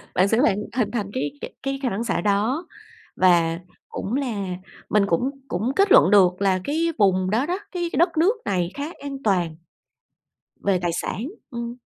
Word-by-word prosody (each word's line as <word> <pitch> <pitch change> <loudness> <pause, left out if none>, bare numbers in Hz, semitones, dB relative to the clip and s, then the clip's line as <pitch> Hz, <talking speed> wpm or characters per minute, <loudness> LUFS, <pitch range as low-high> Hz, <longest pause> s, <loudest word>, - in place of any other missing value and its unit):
Bạn 185 - +4
sẽ 225 +3 +2
phải 235 - +4 0.2
hình 235 -5 +1
thành 210 -5 -2
cái 260 +2 -2
cái - - -7
cái 275 0 -2
khả 255 - +2
năng 220 +1 -2
xạ 235 - -1
đó, 215 - 0 0.5
và 170 -2 +3 0.3
cũng 200 - -5
là 230 -9 -2 0.4
mình 210 -1 +3
cũng 200 +9 +1 0.2
cũng 215 +9 -1
kết 395 0 +3
luận 190 - +7
được 185 -2 +5
là 190 -2 +2
cái 325 - 0
vùng 185 -3 +3
đó 225 +7 +1
đó, 360 +5 -2
cái 350 -2 -2
đất 340 0 +2
nước 370 +9 +4
này 180 -3 0
khá 285 +1 -3 0.2
an 280 -1 -5
toàn, 180 -6 +1 1.1
về 195 -2 +1
tài 175 - +1
sản, - - -4 0.3
ừm. 235 -1 -5
210 Hz, 185 wpm, -23 LUFS, 185-275 Hz, 1.1 s, luận